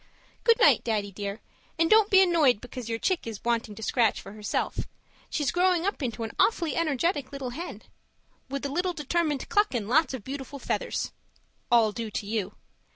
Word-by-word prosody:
Good 460 0 +5
night, 475 - +5
Daddy 210 -3 -1
dear, 200 +2 -5 0.4
and 330 0 +3
don't 430 +2 +5
be 385 -1 +7
annoyed 315 - +4
because 245 -1 -8
your 225 - -1
chick 355 +2 -1
is 220 -3 -7
wanting 230 -2 -1
to 225 - -8
scratch 230 -1 +2
for 195 - -10
herself. 210 0 -2 0.4
She's 295 -3 0
growing 360 -1 +2
up 400 -5 -1
into 235 -3 -3
an 225 - -4
awfully 340 -8 +2
energetic 300 -2 0
little 270 -3 -5
hen 335 +8 -7 0.7
with 275 +1 -4
a - - -1
very 355 +5 0
determined 300 -1 -1
cluck 415 -9 +2
and 215 -4 -2
lots 285 +3 +3
of 240 - -8
beautiful 275 +2 -6
feathers - - -2 0.6
(all 230 -3 +5
due 225 +1 -5
to 205 - -4
you). 210 -2 -3
270 Hz, 185 wpm, -27 LUFS, 225-335 Hz, 0.7 s, be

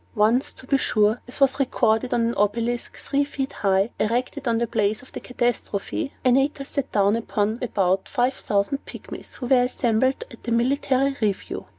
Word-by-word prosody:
Once, 225 +5 +3
to - - -12
be 275 +1 +2
sure 215 0 +2
(as 250 - -8
was 275 0 +3
recorded 245 -2 +1
on 240 - +2
an 230 +1 +1
obelisk, 230 +4 -1
three 280 0 0
feet 275 -1 -4
high, 195 +2 +1
erected 245 +4 -1
on 230 -1 +2
the 235 - +1
place 215 0 0
of 260 - -15
the - - -6
catastrophe), 240 0 -2
Antaeus 270 +2 +2
sat 280 -2 -3
down 200 0 +3
upon 220 -1 -1
about 190 -5 0
five 255 -1 +1
thousand 205 +5 -1
Pygmies, - - -8
who 255 - -6
were 250 0 +4
assembled 250 +1 +1
at 235 - -14
a - - -1
military 270 +3 +2
review. 205 -3 -2
240 Hz, 180 wpm, -24 LUFS, 215-265 Hz, -, were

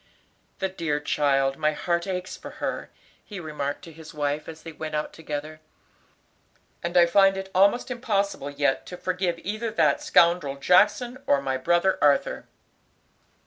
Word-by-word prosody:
"The 190 - -1
dear 165 -6 -2
child; 135 -2 +1
my 155 -1 +1
heart 170 +3 -1
aches 185 -1 -4
for - - -10
her," - - -4 0.3
he 205 -3 -8
remarked 150 -4 -4
to 165 - -10
his 155 -1 -12
wife, 145 +1 -2
as 160 -1 -10
they 165 - -7
went 155 0 -6
out 150 - -3
together, 155 0 -6 1.2
"and 170 +1 -1
I 175 - +8
find 195 +2 +4
it 190 0 -6
almost 200 +7 +3
impossible 200 - -1
yet 145 -2 0
to 180 - -7
forgive 180 -2 -1
either 215 +4 -3
that 225 +6 +2
scoundrel 170 - +3
Jackson 210 - +3
or 140 - +4
my 135 -1 -2
brother 175 +8 +2
Arthur." 145 -1 +2
170 Hz, 155 wpm, -25 LUFS, 150-190 Hz, 1.2 s, I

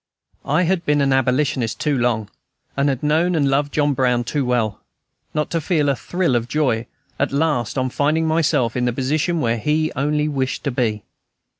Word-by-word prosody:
I 155 +6 +2
had 180 0 0
been 150 -2 +2
an 135 -1 +2
abolitionist 130 -2 0
too 150 -2 0
long, 120 -4 0 0.5
and 140 +1 +2
had 135 -1 -2
known 160 +4 +2
and 145 -3 +2
loved 145 +1 +1
John 145 -1 +1
Brown 125 -2 +1
too 140 +4 -1
well, 120 -5 -1 0.5
not 150 0 -1
to 165 - 0
feel 150 -3 +1
a 140 - +2
thrill 175 -2 -1
of 120 0 0
joy 125 -5 0 0.3
at - - 0
last 140 -5 0
on 130 -1 0
finding 155 +4 +1
myself 155 -7 +1
in 125 -1 0
the 120 - 0
position 155 +6 0
where 115 -2 0
he 155 +6 0
only 150 +2 0
wished 135 -2 -2
to 140 - -1
be. 115 -4 -1
140 Hz, 190 wpm, -20 LUFS, 125-150 Hz, 0.5 s, I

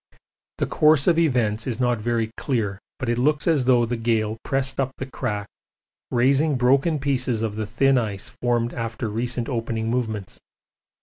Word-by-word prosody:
The - - 0
course 150 -2 +4
of 170 -1 +4
events 120 -8 +1
is 120 -3 -3
not 120 -2 +1
very 115 0 -1
clear, 105 -7 -2 0.2
but 130 - -4
it 120 0 0
looks 150 +4 +1
as 150 -6 +3
though 125 -2 +4
the 120 +1 -2
gale 110 -2 0
pressed 135 0 -1
up 135 -1 0
the 130 - -4
crack, 110 -6 -3 0.6
raising 140 +5 +3
broken 135 +6 +3
pieces 130 -5 0
of 110 -2 -2
the 110 -1 -3
thin 130 +4 +3
ice 105 -4 -4
formed 120 -1 +1
after 115 -1 -4
recent 120 +2 -2
opening 115 -2 -2
movements. 110 -6 -3
120 Hz, 170 wpm, -23 LUFS, 110-135 Hz, 0.6 s, course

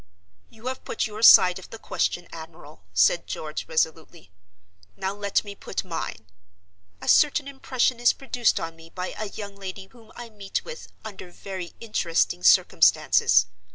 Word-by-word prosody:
"You 225 +1 -18
have 260 0 -4
put - - -2
your 215 0 -7
side 185 -5 +8
of 190 - -13
the 225 - -9
question, 175 -5 -2
admiral," 160 - -12
said 95 - +3
George 155 -1 -5
resolutely; 160 - -2 0.7
"now 190 +1 -2
let 200 -1 -1
me 205 -1 -8
put 195 - -5
mine. 165 -10 -5 0.8
A - - -8
certain 290 -1 +4
impression 255 -3 -1
is 240 - +5
produced 250 -4 0
on 165 0 -6
me 165 0 -15
by 180 +1 -5
a 215 -1 -5
young 200 -1 -8
lady 195 0 -8
whom 230 -2 -18
I 240 -1 -9
meet 200 -2 -4
with 485 0 -9 0.2
under 200 -4 -9
very 185 -1 -8
interesting 170 - 0
circumstances. 90 - +4
195 Hz, 155 wpm, -25 LUFS, 165-225 Hz, 0.8 s, side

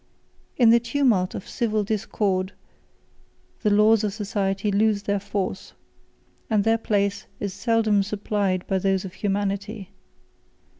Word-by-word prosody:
In 235 -3 +6
the 235 - +6
tumult 235 -7 +1
of - - -7
civil 220 -4 -1
discord, 195 -2 -1 1.1
the 215 - +2
laws 210 +1 +4
of 205 -2 -1
society 200 -1 -1
lose 205 0 +2
their 200 0 0
force, 195 -1 -4 0.8
and 215 -3 +2
their 225 +1 +2
place 200 -2 -1
is 200 -2 -3
seldom 215 0 +2
supplied 200 -2 -1
by 190 -1 0
those 195 0 0
of 185 - -8
humanity. 200 0 -3
205 Hz, 130 wpm, -24 LUFS, 195-220 Hz, 1.1 s, In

